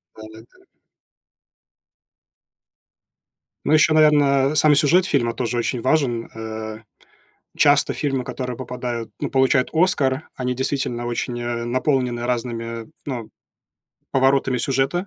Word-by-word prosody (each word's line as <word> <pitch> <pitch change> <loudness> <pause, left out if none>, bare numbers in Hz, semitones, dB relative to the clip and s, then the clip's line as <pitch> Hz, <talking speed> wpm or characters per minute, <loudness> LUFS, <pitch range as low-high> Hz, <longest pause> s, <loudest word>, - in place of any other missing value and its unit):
Да-да-да. 110 +1 -14 3.0
Ну - - 0
ещё, 155 0 +5
наверно, 145 -2 +4
сам 155 0 +5
и - - +4
сюжет 155 +5 +4
фильма 120 -9 0
тоже 120 +1 -2
очень 120 +1 -1
важен. 130 -5 0
Э, 110 -1 -6 0.8
часто 145 -1 +4
фильмы, 135 -3 -2
которые 125 -1 -5
попадают 125 -3 -5
ну, - - -2
получают 130 -1 +2
"Оскар"- 150 -5 +1
они 125 -1 -2
действительно 130 -2 -2
очень, 120 0 -3
э, 120 0 -3
наполнены 125 -1 0
разными, 115 -2 -3
э, - - -19 0.2
ну, 120 -6 -5 0.8
поворотами 135 -1 +2
сюжета. 135 +9 0
125 Hz, 115 wpm, -21 LUFS, 120-140 Hz, 3.0 s, ещё